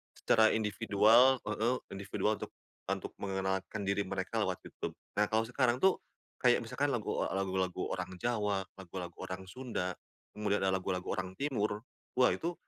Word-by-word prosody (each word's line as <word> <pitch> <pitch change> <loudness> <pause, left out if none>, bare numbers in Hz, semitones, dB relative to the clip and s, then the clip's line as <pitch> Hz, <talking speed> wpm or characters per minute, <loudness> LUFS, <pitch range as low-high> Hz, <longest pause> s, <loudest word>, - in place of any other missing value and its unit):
secara 110 -1 +5
individual 110 +4 +5
heeh, 110 +4 +1 0.2
individual 100 +2 -1
untuk - - -6 0.4
untuk - - -2
mengenalkan 95 +1 -2
diri 100 0 +1
mereka 95 +4 -2
lewat 95 -2 -2
YouTube. - - -5 0.2
Nah, 105 - +5
kalau 110 +1 +3
sekarang 125 0 +2
tuh 190 -1 +5 0.4
kayak - - +5
misalkan - - 0
lagu, - - -1
eee, - - -2
lagu-lagu 95 -1 -1
orang 95 - -4
Jawa, 105 -5 +1 0.2
lagu-lagu 90 -2 -7
orang 95 +1 -5
Sunda, 115 -8 -3 0.4
kemudian 105 -1 0
ada 95 - +3
lagu-lagu 95 0 -2
orang 95 0 -3
timur, 110 -7 0 0.4
wah 125 - +6
itu 170 +2 -2
105 Hz, 150 wpm, -33 LUFS, 95-115 Hz, 0.4 s, wah